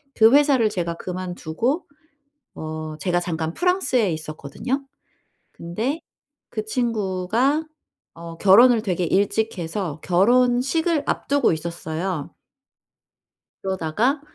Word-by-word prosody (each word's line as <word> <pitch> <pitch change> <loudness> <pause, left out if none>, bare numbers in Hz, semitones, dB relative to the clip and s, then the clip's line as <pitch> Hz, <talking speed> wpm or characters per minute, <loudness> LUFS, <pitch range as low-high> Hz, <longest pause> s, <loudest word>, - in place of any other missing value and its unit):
그 220 +1 +6
회사를 280 -6 +5
제가 170 -4 -3
그만두고 185 - -3 0.7
어 155 0 -6
제가 175 0 +1
잠깐 160 -2 -3
프랑스에 350 - +1
있었거든요. 155 - -4 0.7
근데 220 - -3 0.5
그 215 -2 -4
친구가 225 +4 0 0.5
어 165 0 -9
결혼을 225 +5 +6
되게 185 -4 -1
일찍 205 +5 +1
해서 165 -2 -4
결혼식을 250 - +2
앞두고 280 -7 +1
있었어요. 165 0 -4 1.3
그러다가 195 - 0
195 Hz, 230 characters per minute, -23 LUFS, 170-250 Hz, 1.3 s, 그